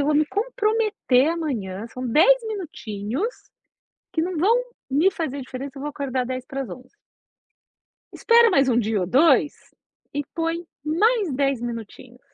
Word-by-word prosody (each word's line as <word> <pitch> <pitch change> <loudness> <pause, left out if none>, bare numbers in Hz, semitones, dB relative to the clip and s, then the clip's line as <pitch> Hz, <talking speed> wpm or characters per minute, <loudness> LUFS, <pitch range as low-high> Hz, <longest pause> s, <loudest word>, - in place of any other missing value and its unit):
eu 280 - +1
vou 300 - +2
me 300 +1 +3
comprometer 425 - +1
amanhã, 230 - -3
são 255 +2 -6
10 390 - +5
minutinhos 310 - -4 0.8
que 325 - +1
não 345 0 -2
vão 405 +9 +4 0.3
me 305 +8 +3
fazer 310 -7 -4
diferença, 260 +1 -7
eu 275 - -8
vou 295 - -3
acordar 265 -3 -2
10:50. 255 -1 -6 1.2
Espera 470 0 +5
mais 275 -8 +3
1 235 - +3
dia 220 -3 0
ou 180 - -1
2, 290 - +4 0.6
e 290 0 -1
põe 330 +1 -2 0.2
mais 395 - +2
10 275 -2 0
minutinhos. 240 +1 -7
285 Hz, 140 wpm, -23 LUFS, 255-350 Hz, 1.2 s, 10